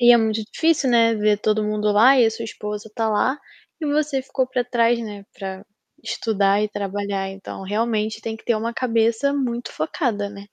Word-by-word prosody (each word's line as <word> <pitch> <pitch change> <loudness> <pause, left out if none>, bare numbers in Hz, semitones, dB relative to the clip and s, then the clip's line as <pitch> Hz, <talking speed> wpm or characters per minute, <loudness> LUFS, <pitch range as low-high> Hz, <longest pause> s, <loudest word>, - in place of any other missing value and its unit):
E 240 0 +7
é - - +8
muito 220 -1 0
difícil, 320 -4 +2
né, 230 -1 +4
ver 210 -1 +2
todo 215 +1 +1
mundo 210 0 0
lá 250 +6 +6
e 245 - +6
a - - +2
sua 225 +1 -6
esposa 210 0 -6
está 225 +1 -2
lá, 255 +6 +1 0.4
e 310 - -2
você 290 -2 0
ficou 260 0 -1
para 250 -1 -1
trás 235 -1 +2
né, 210 -3 -7
para 190 0 -6 0.4
estudar 200 -2 +1
e 215 - 0
trabalhar, 200 -1 -3
então 195 0 -8
realmente 215 +2 -1
tem 220 -1 -4
que - - -19
ter 235 - +2
uma 230 +2 -2
cabeça 230 +3 +1
muito 245 -4 -2
focada, 205 - -2
né? 200 - -11
220 Hz, 200 wpm, -22 LUFS, 205-240 Hz, 0.4 s, é